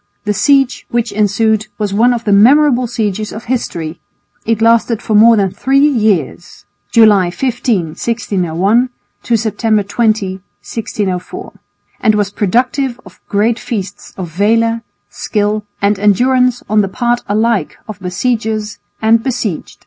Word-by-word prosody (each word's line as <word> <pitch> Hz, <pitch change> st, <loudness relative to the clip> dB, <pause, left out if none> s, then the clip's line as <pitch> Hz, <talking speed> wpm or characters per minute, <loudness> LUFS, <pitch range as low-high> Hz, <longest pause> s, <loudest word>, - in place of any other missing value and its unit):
The 210 Hz, -, 0 dB
siege 270 Hz, +4 st, +1 dB
which 235 Hz, -2 st, -1 dB
ensued 215 Hz, +1 st, +1 dB
was 210 Hz, -2 st, -2 dB
one 235 Hz, +5 st, +3 dB
of 235 Hz, -1 st, -2 dB
the 210 Hz, -, 0 dB
memorable 250 Hz, +4 st, +4 dB
sieges 215 Hz, -3 st, -3 dB
of 220 Hz, -, -8 dB
history, 170 Hz, -10 st, -4 dB, 0.5 s
it 225 Hz, -1 st, +1 dB
lasted 230 Hz, 0 st, +2 dB
for 225 Hz, -, -4 dB
more 225 Hz, +2 st, +6 dB
than 195 Hz, -2 st, +1 dB
three 270 Hz, +7 st, 0 dB
years 210 Hz, -, -1 dB, 0.3 s
(July 210 Hz, -5 st, +5 dB
15,1601, 210 Hz, -, -1 dB, 0.3 s
to 235 Hz, -, +1 dB
September 220 Hz, -1 st, 0 dB
20,1604) 205 Hz, -, -3 dB, 0.5 s
and 215 Hz, -2 st, +2 dB
was 205 Hz, -1 st, 0 dB
productive 250 Hz, +5 st, 0 dB
of -, -, -16 dB
great 220 Hz, +3 st, +1 dB
feats 200 Hz, -3 st, -6 dB
of 180 Hz, -4 st, -6 dB
valour, 230 Hz, +5 st, +1 dB, 0.3 s
skill 210 Hz, 0 st, -2 dB, 0.2 s
and 200 Hz, 0 st, +2 dB
endurance 250 Hz, +4 st, +2 dB
on 215 Hz, +1 st, +3 dB
the 195 Hz, -, -1 dB
part 240 Hz, +3 st, -1 dB
alike 220 Hz, +1 st, 0 dB
of 210 Hz, -2 st, -8 dB
besiegers 215 Hz, +3 st, -2 dB, 0.2 s
and 225 Hz, +1 st, +4 dB
besieged. 235 Hz, -8 st, -4 dB
220 Hz, 130 wpm, -14 LUFS, 200-235 Hz, 0.5 s, more